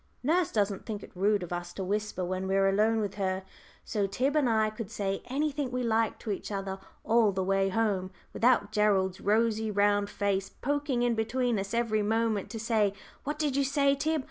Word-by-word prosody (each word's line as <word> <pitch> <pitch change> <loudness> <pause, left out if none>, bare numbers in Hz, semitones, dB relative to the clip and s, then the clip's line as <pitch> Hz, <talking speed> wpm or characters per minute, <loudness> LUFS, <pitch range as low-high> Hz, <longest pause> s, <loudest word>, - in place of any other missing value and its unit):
Nurse 335 +5 +2
doesn't 200 -2 -1
think 210 -3 -4
it - - -11
rude 200 +1 +2
of 175 - -5
us 175 0 -5
to 195 - -4
whisper 205 -1 -2
when 185 +1 -3
we 190 - +1
are 195 0 +4
alone 215 +3 +2
with 205 -2 -2
her, 190 0 -1 0.4
so 205 -2 0
Tib 260 +9 0
and 290 -5 +3
I 220 -1 +2
could 215 -1 -6
say 195 -1 -2
anything 285 0 -1
we 250 0 -2
liked 225 -1 +1
to 215 - -2
each 200 - -4
other 195 -1 -3 0.2
all 225 -2 +4
the 190 0 -1
way 195 +1 +2
home, 195 -3 0 0.2
without 235 -4 +3
Gerald's 195 -3 +2
rosy 220 +1 +1
round 205 0 +2
face 200 -1 -1
poking 285 -3 -1
in 240 -1 +2
between 230 +1 0
us 195 +3 -3
every 225 -2 +1
moment 220 -1 0
to 225 +1 -6
say, 215 -3 +1 0.3
"What 295 +1 -2
did 295 -3 0
you 280 - +3
say, 280 0 +2
Tib?" 310 +3 0
215 Hz, 205 wpm, -29 LUFS, 195-240 Hz, 0.4 s, are